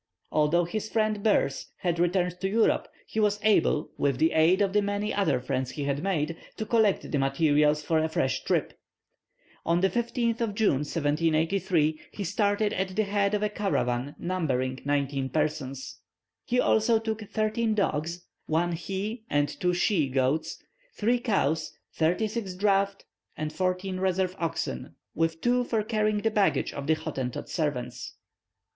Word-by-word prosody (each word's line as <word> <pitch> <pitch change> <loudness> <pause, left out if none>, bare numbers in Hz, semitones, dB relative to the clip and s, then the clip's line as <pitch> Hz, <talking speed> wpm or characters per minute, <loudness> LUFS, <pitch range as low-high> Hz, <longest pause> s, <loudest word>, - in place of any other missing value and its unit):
Although 155 +3 +3
his 215 +5 -4
friend 215 -2 0
Boers 200 -10 +1
had 170 -2 -1
returned 180 0 +1
to 190 - 0
Europe, 220 +2 +2 0.2
he 220 - -4
was 210 -1 +2
able, 195 -7 +3
with 140 -3 +1
the 160 +3 +3
aid 160 +4 +4
of 200 -2 +1
the 210 - +4
many 205 +1 -1
other 160 -11 +1
friends 130 0 -2
he 145 +3 -5
had 140 0 -1
made, 165 -4 -1 0.2
to 220 - -3
collect 215 -2 +2
the 145 - +1
materials 150 +2 +2
for 160 +1 +2
a 160 0 0
fresh 135 -4 0
trip. - - -1 0.8
On 170 +1 +2
the 190 - +3
15th 235 -1 0 0.2
June, 210 - +3
1783, 160 +2 +1
he 205 - -4
started 205 +2 +1
at 190 0 -2
the 215 - +2
head 200 0 +1
of 210 - -1
a 210 - +1
caravan 145 -11 -1
numbering 130 -8 -1
nineteen 140 -1 0
persons. 140 -2 -2 0.5
He 250 +1 +1
also 225 0 +3
took 220 0 -3
thirteen 215 +1 0
dogs, 170 -3 -1 0.2
one 170 +2 +1
he 195 +7 -4
and 145 0 +2
two 180 +2 -1
she 175 -6 +2
goats, 135 +4 0 0.4
three 240 +3 +2
cows, 165 - 0 0.2
thirty 170 +7 +1
six 205 -4 -4
draught 195 0 +1 0.3
and 155 0 -3
fourteen 185 0 -1
reserve 185 0 0
oxen, 160 - -3 0.2
with 165 0 -1
two 245 +1 +2
for 225 -3 0
carrying 215 -1 0
the 225 - +2
baggage 205 -2 +1
of 140 0 -6
the 160 - +4
Hottentot 130 -5 -4
servants. 125 -7 -3
180 Hz, 160 wpm, -27 LUFS, 150-210 Hz, 0.8 s, aid